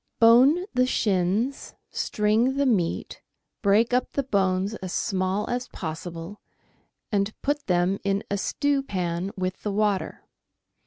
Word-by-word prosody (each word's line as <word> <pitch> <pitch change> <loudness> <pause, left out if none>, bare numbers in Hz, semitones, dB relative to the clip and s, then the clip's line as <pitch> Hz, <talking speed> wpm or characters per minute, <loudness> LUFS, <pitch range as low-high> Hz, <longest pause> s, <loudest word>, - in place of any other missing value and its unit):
— - - -53
Bone 255 +10 +6
the 255 0 +3
shins, 210 +4 0 0.2
string 220 +5 +1
the 280 - +2
meat, 195 -10 0 0.4
break 220 +4 +3
up 250 - +1
the 280 - 0
bones 195 -4 0
as 185 -2 -6
small 190 0 -1
as 245 +1 -2
possible, 165 +3 -7 0.7
and 200 0 -1
put 290 +1 -1
them 180 +1 +1
in 200 0 0
a - - +2
stewpan 195 - -1
with 185 0 -3
the 210 - -2
water. 205 -1 -1
205 Hz, 135 wpm, -25 LUFS, 185-245 Hz, 0.7 s, Bone